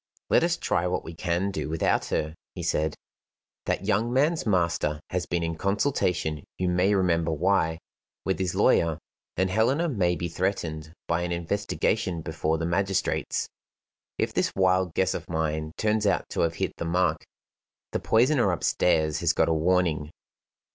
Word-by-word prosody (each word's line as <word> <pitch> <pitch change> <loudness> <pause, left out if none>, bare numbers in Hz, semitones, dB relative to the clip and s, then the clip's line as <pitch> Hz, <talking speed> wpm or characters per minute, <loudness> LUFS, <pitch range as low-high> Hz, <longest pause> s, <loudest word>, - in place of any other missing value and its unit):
"Let - - +5
us 170 -1 +1
try 90 - 0
what 90 - -1
we 80 - -8
can 85 +4 -1
do 95 - -3
without 80 +1 +1
her," 80 0 -1 0.2
he - - -5
said. 75 0 0 0.7
"That - - -1
young 115 +4 +1
man's 150 +3 +2
master 85 -6 +1
has 90 -2 -1
been 85 -1 -1
in 85 0 -2
consultation 90 - 0
(you 90 -1 0
may 90 +3 +3
remember 85 -3 +2
why) 80 0 +1 0.5
with 95 -1 0
his 95 -2 -1
lawyer, 80 -2 +3 0.4
and 95 +1 +1
Helena 130 - +2
may 90 - +1
be 85 +1 -3
threatened 80 -3 -2 0.2
by 85 +1 +1
an 90 0 -2
investigation 90 +1 -1
before 80 0 -1
the 80 - -2
magistrates. 95 +2 0 0.7
If - - -1
this - - +1
wild 95 -2 +2
guess 95 - +2
of - - -6
mine 80 -1 -1
turns 105 -1 +1
out - - +1
to - - -1
have 85 0 +1
hit - - -3
the - - -4
mark, 90 +2 +1 0.7
the - - -1
poisoner 120 -2 +3
upstairs 80 -2 +1
has - - +2
got - - +2
a - - +3
warning." 80 -2 +1
90 Hz, 165 wpm, -26 LUFS, 80-100 Hz, 0.7 s, Let